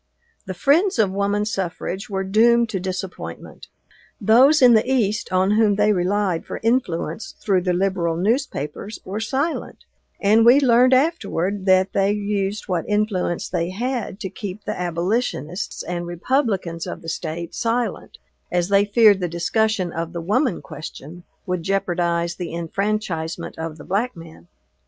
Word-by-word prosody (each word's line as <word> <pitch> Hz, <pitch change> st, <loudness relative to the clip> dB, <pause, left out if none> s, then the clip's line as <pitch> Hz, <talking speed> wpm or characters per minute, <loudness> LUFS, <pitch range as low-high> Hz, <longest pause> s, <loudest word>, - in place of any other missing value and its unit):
The 185 Hz, -, -4 dB
friends 310 Hz, -, +3 dB
of 210 Hz, -4 st, +3 dB
woman 200 Hz, +1 st, 0 dB
suffrage 190 Hz, -1 st, -4 dB
were 195 Hz, -1 st, -2 dB
doomed 230 Hz, +4 st, +4 dB
to 195 Hz, -, -2 dB
disappointment. 185 Hz, 0 st, -6 dB, 0.5 s
Those 255 Hz, +8 st, +5 dB
in 250 Hz, -3 st, +7 dB
the 225 Hz, +4 st, +3 dB
East, 215 Hz, -4 st, 0 dB
on 185 Hz, +1 st, +2 dB
whom 210 Hz, -1 st, +3 dB
they 210 Hz, +1 st, +3 dB
relied 185 Hz, -1 st, 0 dB
for -, -, -6 dB
influence 220 Hz, -7 st, -1 dB
through 190 Hz, -3 st, +1 dB
the 180 Hz, 0 st, 0 dB
liberal 175 Hz, -3 st, 0 dB
newspapers, 205 Hz, -, -2 dB
were 200 Hz, +3 st, -4 dB
silent, 270 Hz, +9 st, -2 dB, 0.4 s
and 215 Hz, +3 st, +4 dB
we 245 Hz, +4 st, +7 dB
learned, 255 Hz, -1 st, +5 dB
afterward, 205 Hz, -, 0 dB
that 185 Hz, 0 st, +4 dB
they 195 Hz, 0 st, +2 dB
used 205 Hz, 0 st, -2 dB
what 180 Hz, -1 st, -2 dB
influence 210 Hz, -5 st, 0 dB
they 170 Hz, +1 st, -2 dB
had 230 Hz, 0 st, -3 dB
to 190 Hz, -, -3 dB
keep 200 Hz, 0 st, -7 dB
the -, -, -2 dB
abolitionists 180 Hz, +1 st, -2 dB
and 175 Hz, 0 st, -4 dB
Republicans 180 Hz, -, -1 dB
of 170 Hz, -, -7 dB
the -, -, -10 dB
State 165 Hz, +1 st, -4 dB
silent, 235 Hz, +1 st, -2 dB, 0.3 s
as 175 Hz, +1 st, 0 dB
they 200 Hz, 0 st, +4 dB
feared 210 Hz, -1 st, +5 dB
the 180 Hz, -, -1 dB
discussion 185 Hz, +2 st, 0 dB
of 165 Hz, 0 st, -4 dB
the 170 Hz, -, -4 dB
woman 215 Hz, -, 0 dB
question 160 Hz, +2 st, -9 dB, 0.2 s
would 180 Hz, -2 st, -2 dB
jeopardize 175 Hz, -2 st, 0 dB
the 175 Hz, -2 st, -5 dB
enfranchisement 170 Hz, -1 st, -3 dB
of 160 Hz, -1 st, -5 dB
the 145 Hz, -, -11 dB
black 215 Hz, +7 st, -1 dB
man. 165 Hz, -, -13 dB
195 Hz, 150 wpm, -22 LUFS, 175-220 Hz, 0.5 s, in